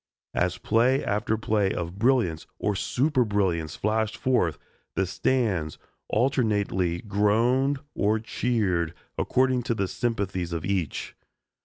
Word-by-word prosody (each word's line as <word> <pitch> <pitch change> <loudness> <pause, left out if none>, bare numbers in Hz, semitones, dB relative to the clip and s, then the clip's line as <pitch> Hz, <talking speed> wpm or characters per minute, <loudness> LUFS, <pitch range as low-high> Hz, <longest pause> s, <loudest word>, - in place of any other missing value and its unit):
As 90 0 0
play 120 +8 +2
after 105 +2 0
play 105 -3 +1
of 85 +3 -4
brilliance 115 -10 +2
or 105 - 0
superbrilliance 100 - 0
flashed 110 +1 0
forth, 115 - +1 0.4
the 95 - +1
stands 95 - 0 0.3
alternately 105 -8 +1
groaned 115 +7 +2 0.2
or 105 +2 +2
cheered, 105 -8 0 0.2
according 130 -1 +2
to 115 -1 -1
the 100 -3 0
sympathies 95 -7 -2
of 85 -2 -3
each. 95 -7 -2
105 Hz, 115 wpm, -26 LUFS, 90-120 Hz, 0.4 s, play